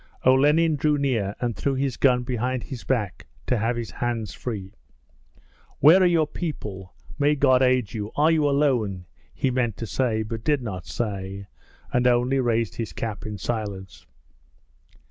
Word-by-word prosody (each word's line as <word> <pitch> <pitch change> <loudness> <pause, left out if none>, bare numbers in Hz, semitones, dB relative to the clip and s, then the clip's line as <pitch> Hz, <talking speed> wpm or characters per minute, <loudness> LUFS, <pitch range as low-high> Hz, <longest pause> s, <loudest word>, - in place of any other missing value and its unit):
Olenin 150 +5 +4
drew 150 +1 +2
near 115 -8 0
and 120 -3 -2
threw 140 -1 -1
his 135 -2 -1
gun 125 -2 +3
behind 125 0 -2
his 130 -4 -7
back 110 -8 -2 0.2
to 125 - +1
have 115 +3 0
his 120 -1 -5
hands 115 -5 -3
free. 100 -5 -6 1.1
'Where 160 +7 +7
are 185 - +6
your 165 -3 +3
people? 105 - -6 0.2
May 145 +1 +3
God 130 -2 +4
aid 125 -5 +2
you! 105 -2 -4
Are 155 +3 +4
you 155 -3 +3
alone?' 120 -11 +1 0.3
he 130 - -1
meant 120 -4 -1
to 115 - -4
say 110 -2 0
but 110 +1 -6
did 145 -2 +1
not 95 -6 -6
say, 100 -3 -4 0.5
and 125 0 +3
only 125 +2 +2
raised 115 -3 0
his 115 - -4
cap 110 -1 -5
in 105 -1 -5
silence. 100 - -5
120 Hz, 165 wpm, -24 LUFS, 110-135 Hz, 1.1 s, Where